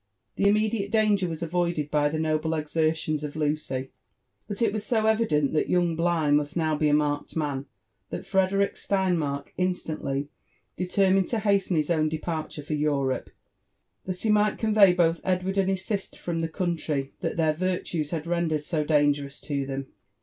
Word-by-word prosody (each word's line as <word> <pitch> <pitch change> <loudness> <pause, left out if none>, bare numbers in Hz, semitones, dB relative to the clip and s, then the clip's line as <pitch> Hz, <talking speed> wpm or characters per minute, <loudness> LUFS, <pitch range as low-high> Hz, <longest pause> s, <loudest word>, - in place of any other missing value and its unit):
The 200 - +2
immediate 210 0 +1
danger 210 -4 +2
was 165 0 -4
avoided 170 -3 -1
by 145 -1 +3
the 155 - -2
noble 155 0 0
exertions 155 0 0
of 150 0 -5
Lucy; 145 -4 -2 0.6
but 205 -1 -5
it 225 -4 +2
was 215 -1 -2
so 220 0 +1
evident 215 -11 +2
that 155 - +1
young 175 -2 +2
Bligh 165 -3 +1
must 145 +3 +1
now 160 -2 +1
be 150 0 +1
a - - +3
marked 145 -1 -1
man, 145 -4 -2 0.4
that - - -5
Frederick 195 +1 +1
Steinmark 170 -8 0
instantly 155 -6 -2 0.5
determined 190 +1 +2
to 235 - -1
hasten 200 -3 +1
his 155 +1 +1
own 155 -2 +2
departure 155 -1 -4
for 155 - -4
Europe, 145 -3 0 0.8
that 185 -1 -4
he 220 - +3
might 210 0 +3
convey 215 -4 +5
both 170 -2 +2
Edward 185 +1 0
and 190 0 +2
his 190 0 -1
sister 200 -3 -3
from 170 -1 -3
the 165 0 -1
country 160 -6 -2
that - - -3
their 160 -2 +3
virtues 175 -3 -2
had 160 -1 -3
rendered 170 -3 0
so 155 0 -1
dangerous 145 -2 +1
to 140 -2 -3
them. 135 0 -4
165 Hz, 170 wpm, -26 LUFS, 150-190 Hz, 0.8 s, convey